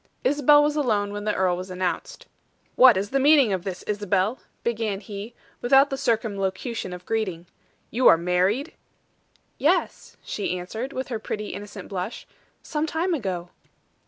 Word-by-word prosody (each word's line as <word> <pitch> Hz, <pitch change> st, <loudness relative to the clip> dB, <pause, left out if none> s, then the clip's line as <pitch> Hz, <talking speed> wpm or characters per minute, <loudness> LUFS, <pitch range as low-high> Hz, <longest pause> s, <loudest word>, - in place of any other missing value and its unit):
Isabel 290 Hz, +1 st, +5 dB
was 295 Hz, 0 st, +1 dB
alone 210 Hz, -8 st, 0 dB
when 205 Hz, 0 st, -5 dB
the 210 Hz, -, 0 dB
earl 185 Hz, -2 st, +2 dB
was 185 Hz, +1 st, -6 dB
announced. 180 Hz, -2 st, -3 dB, 0.5 s
"What 250 Hz, -5 st, +7 dB
is 200 Hz, +2 st, -2 dB
the 275 Hz, -, +2 dB
meaning 275 Hz, -6 st, +5 dB
of 185 Hz, -2 st, -2 dB
this, 185 Hz, -2 st, -5 dB
Isabel?" 205 Hz, +2 st, 0 dB, 0.2 s
began 225 Hz, -4 st, -1 dB
he, 205 Hz, +3 st, -8 dB, 0.3 s
without 270 Hz, +3 st, +5 dB
the -, -, 0 dB
circumlocution 220 Hz, -4 st, -2 dB
of 180 Hz, 0 st, -8 dB
greeting. 190 Hz, -7 st, -2 dB, 0.5 s
"You 245 Hz, +3 st, +3 dB
are -, -, +8 dB
married?" 185 Hz, -, 0 dB, 0.9 s
"Yes," -, -, 0 dB
she 190 Hz, -3 st, -3 dB
answered, 220 Hz, +9 st, -5 dB
with 260 Hz, 0 st, -4 dB
her 230 Hz, -3 st, -3 dB
pretty, 210 Hz, -1 st, -4 dB
innocent 200 Hz, 0 st, -8 dB
blush. 190 Hz, +3 st, -5 dB, 0.4 s
"Some 305 Hz, 0 st, -2 dB
time 335 Hz, +4 st, -1 dB
ago." 185 Hz, -, -3 dB
210 Hz, 155 wpm, -25 LUFS, 190-260 Hz, 0.9 s, are